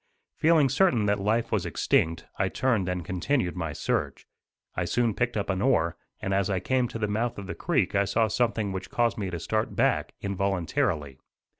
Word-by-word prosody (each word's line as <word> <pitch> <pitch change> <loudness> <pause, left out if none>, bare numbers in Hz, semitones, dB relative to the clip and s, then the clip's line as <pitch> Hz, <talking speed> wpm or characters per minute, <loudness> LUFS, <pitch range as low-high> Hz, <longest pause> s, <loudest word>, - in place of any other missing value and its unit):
Feeling 160 -3 +4
certain 130 - +3
that 100 0 +1
life 110 +4 0
was - - +1
extinct, 80 0 +1
I 95 -1 +2
turned 115 -7 +1
and 90 -2 -3
continued 95 - 0
my 85 -3 -3
search. - - -2 0.5
I - - 0
soon 120 -2 +1
picked 120 +2 -1
up 100 - -1
an 95 -1 -1
oar, 85 -11 +2 0.2
and 95 - -2
as 100 0 +1
I 95 -2 +1
came 125 +6 +1
to 115 - -6
the 110 -1 -1
mouth 110 +3 -1
of 100 - -6
the 90 - -5
creek - - 0
I 100 0 +3
saw 110 +3 +2
something 110 -2 0
which 95 0 -5
caused 120 -2 +1
me 100 -2 -2
to 85 -2 -4
start 110 +6 -1
back, - - +1
involuntarily. 90 -8 -1
100 Hz, 195 wpm, -27 LUFS, 90-120 Hz, 0.5 s, Feeling